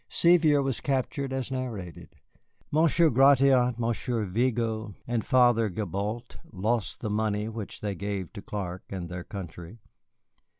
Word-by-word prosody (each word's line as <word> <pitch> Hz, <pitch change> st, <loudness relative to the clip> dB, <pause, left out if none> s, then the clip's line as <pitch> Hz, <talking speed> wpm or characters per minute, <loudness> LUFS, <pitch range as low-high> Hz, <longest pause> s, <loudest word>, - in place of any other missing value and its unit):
Sevier 160 Hz, -5 st, +4 dB
was 135 Hz, -3 st, -2 dB
captured 135 Hz, 0 st, -1 dB
as 135 Hz, -1 st, -3 dB
narrated. 115 Hz, -10 st, -6 dB, 0.6 s
Monsieur 160 Hz, +1 st, +4 dB
Gratiot, 135 Hz, -1 st, +5 dB
Monsieur 115 Hz, -1 st, -1 dB
Vigo, 110 Hz, 0 st, -1 dB
and 120 Hz, -2 st, -1 dB
Father 120 Hz, -4 st, +4 dB
Gibault 105 Hz, +5 st, -4 dB
lost 110 Hz, +2 st, -1 dB
the 110 Hz, -, -2 dB
money 105 Hz, 0 st, 0 dB
which 110 Hz, -2 st, -7 dB
they 105 Hz, -1 st, -2 dB
gave 95 Hz, -1 st, -4 dB
to 100 Hz, -, -7 dB
Clark 95 Hz, -3 st, -5 dB
and 90 Hz, -3 st, -5 dB
their 90 Hz, 0 st, -5 dB
country. 90 Hz, 0 st, -8 dB
115 Hz, 130 wpm, -27 LUFS, 100-130 Hz, 0.6 s, Gratiot